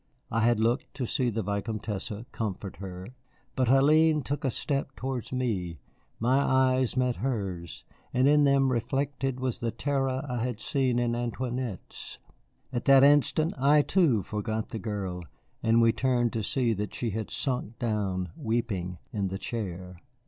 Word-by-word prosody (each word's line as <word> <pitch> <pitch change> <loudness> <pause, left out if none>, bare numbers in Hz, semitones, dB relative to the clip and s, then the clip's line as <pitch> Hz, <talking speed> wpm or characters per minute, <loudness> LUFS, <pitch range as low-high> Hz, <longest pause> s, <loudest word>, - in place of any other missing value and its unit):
I 115 - +1
had 115 0 +3
looked 115 +4 0
to 135 -3 -2
see 125 +1 0
the 110 -1 -2
Vicomtesse 100 +1 -3 0.2
comfort 100 -3 -4
her. 95 -2 -7 0.5
But 130 -1 +1
Hélène 150 +4 +5
took 145 +4 -3
a 135 - +2
step 135 +2 -2
towards 130 -2 -4
me, 105 -10 -2 0.4
my 125 +4 +3
eyes 130 -2 +2
met 125 -1 +1
hers, 95 -10 -3 0.3
and 130 +2 +3
in 150 0 +5
them 135 -1 +4
reflected 135 +2 -1
was 130 -2 -2
the 115 - -1
terror 135 +2 -1
I 125 -2 -2
had 120 -2 -2
seen 130 -1 0
in 120 -1 +1
Antoinette's. 120 -2 -4 0.6
At 120 - -2
that 135 -1 +7
instant 145 +3 +4
I, 145 +2 +5
too, 145 - +3
forgot 110 +2 -3
the 110 - -5
girl, 95 -4 -4 0.4
and 115 0 +4
we 115 - +6
turned 120 -1 +1
to 115 - -1
see 120 +2 +1
that 105 0 -4
she 115 -3 -2
had 110 +1 -4
sunk 125 -5 -2
down, 100 -6 -1
weeping, 105 -6 -2 0.2
in 100 -2 0
the 95 +1 -3
chair. 95 -5 -5
120 Hz, 160 wpm, -28 LUFS, 105-130 Hz, 0.6 s, that